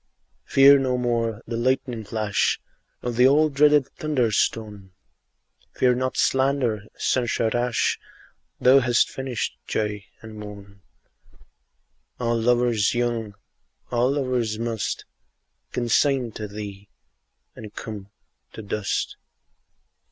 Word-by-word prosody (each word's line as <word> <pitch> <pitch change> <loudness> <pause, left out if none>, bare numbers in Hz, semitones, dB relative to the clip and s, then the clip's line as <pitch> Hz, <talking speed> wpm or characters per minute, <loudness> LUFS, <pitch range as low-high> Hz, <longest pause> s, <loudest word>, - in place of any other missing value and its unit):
Fear 140 +1 +7
no 130 -2 0
more 115 -2 -1
the 115 - -4
lightning 125 -1 0
flash 110 -1 0 0.4
Nor 120 - -1
the 125 +2 +5
all 155 +3 +4
dreaded 145 -1 +4
thunder 145 -8 -1
stone; 105 -3 -2 0.8
Fear 125 -1 +3
not 130 +1 -2
slander, 130 -6 +1
censure 120 -2 0
rash; 120 0 0 0.6
Thou 130 +2 +6
hast 120 -2 +2
finished 130 -3 -4
joy 105 -1 -2 0.2
and 110 -1 -10
moan: 100 -1 -11 1.4
All 120 -1 0
lovers 120 -2 +2
young, 115 -4 -1 0.6
all 125 +2 +2
lovers 125 -6 -1
must 115 -2 -3 0.7
Consign 125 +1 +1
to 105 0 -6
thee, 100 -1 -8 0.7
and 110 -2 -9
come 105 -3 -7 0.4
to 110 - -8
dust. 105 0 -2
120 Hz, 105 wpm, -24 LUFS, 105-130 Hz, 1.4 s, Fear